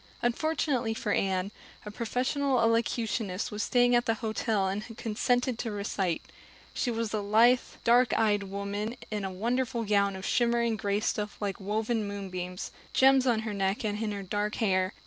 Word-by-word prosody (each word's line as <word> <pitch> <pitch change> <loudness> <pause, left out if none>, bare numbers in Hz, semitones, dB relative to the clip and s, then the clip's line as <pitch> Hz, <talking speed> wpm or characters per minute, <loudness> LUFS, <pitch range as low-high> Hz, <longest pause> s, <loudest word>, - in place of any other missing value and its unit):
Unfortunately 250 -2 0
for 210 - -2
Anne, 190 0 0 0.3
a 210 - -6
professional 255 +4 0
elocutionist 230 -3 0
was 210 0 -3
staying 245 +1 +3
at 240 0 +2
the 225 - +2
hotel 220 -3 -1
and 195 +2 -2
had 225 0 -11
consented 245 +2 0
to 230 - -2
recite. 200 -4 -2 0.5
She 250 - -1
was 230 -2 -2
a 215 - +1
lithe, 225 +5 +5 0.2
dark 245 +1 +5
eyed 210 -2 +3
woman 200 +4 -4
in 210 -2 -2
a 190 - -2
wonderful 235 +4 -1
gown 200 -2 +2
of 190 0 -7
shimmering 235 -1 +2
gray 205 -1 -1
stuff 210 -1 -2
like 200 -2 -3
woven 215 +2 -1
moonbeams, 185 -2 -5
with - - -26
gems 265 0 +5
on 230 -3 +2
her 220 -1 -4
neck 195 +2 -1
and 210 0 -2
in 215 - -1
her 200 -1 -4
dark 205 +2 -2
hair. 185 -3 +1
215 Hz, 175 wpm, -29 LUFS, 200-235 Hz, 0.5 s, lithe